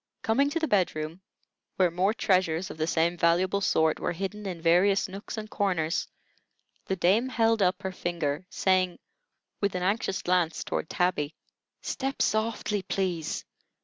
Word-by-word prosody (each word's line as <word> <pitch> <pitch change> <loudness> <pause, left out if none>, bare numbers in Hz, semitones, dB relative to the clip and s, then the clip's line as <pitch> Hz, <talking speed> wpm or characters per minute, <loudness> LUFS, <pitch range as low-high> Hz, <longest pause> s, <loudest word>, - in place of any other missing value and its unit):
Coming 275 +6 +3
to 330 - -1
the 320 - 0
bed 195 - +2
room, 155 +4 -5 0.5
where 180 -2 +3
more 185 +4 +2
treasures 185 -5 +1
of - - -10
the 155 - 0
same 170 +1 +1
valuable 180 +4 +2
sort 160 -4 +2
were - - -1
hidden 195 +3 -5
in 180 -3 -4
various 180 +5 +3
nooks 195 +4 -7
and 215 0 -5
corners, 180 -7 0 0.8
the 190 - 0
dame 200 +8 +2
held 225 -3 +2
up 185 -1 +2
her 190 - -2
finger, 170 -2 -3
saying, 185 -3 +1 0.6
with 200 -2 0
an 180 - -1
anxious 195 0 0
glance 175 -3 +1
toward - - -3
Tabby: 170 -4 0 0.5
"Step 270 0 -3
softly, 215 -1 0
please. 180 -5 -2
185 Hz, 155 wpm, -28 LUFS, 170-205 Hz, 0.8 s, Coming